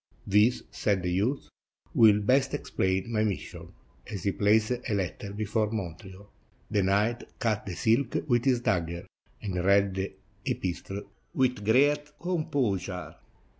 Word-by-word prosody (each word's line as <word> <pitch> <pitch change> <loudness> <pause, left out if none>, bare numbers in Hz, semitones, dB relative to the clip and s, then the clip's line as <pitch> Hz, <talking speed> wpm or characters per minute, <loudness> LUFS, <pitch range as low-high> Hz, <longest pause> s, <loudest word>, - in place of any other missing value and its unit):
"This," 105 +5 +3
said 100 -4 0
the 90 - -1
youth, 110 +10 0 0.5
"will 105 -2 +6
best 130 +5 +2
explain 95 +4 -1
my 110 -1 +2
mis 105 -4 0
sion," - - -10 0.4
as 100 -5 -5
he 100 - +2
placed 105 +3 +3
a 125 -2 -2
letter 95 +1 -3
before 105 +1 -1
Montreal. 95 -1 -6 0.4
The 105 -2 +3
knight 105 +5 +1
cut 110 -3 -1
the 90 - -4
silk 120 - +1
with 120 -2 +2
his 125 -3 +3
dagger, 85 -4 -1 0.4
and 90 -4 -2
read 100 0 +4
the 95 +1 -3 0.4
epistle 95 +2 -3 0.3
with 125 -4 +1
great 145 +6 +2
composure. 120 - -1
105 Hz, 140 wpm, -28 LUFS, 95-120 Hz, 0.5 s, will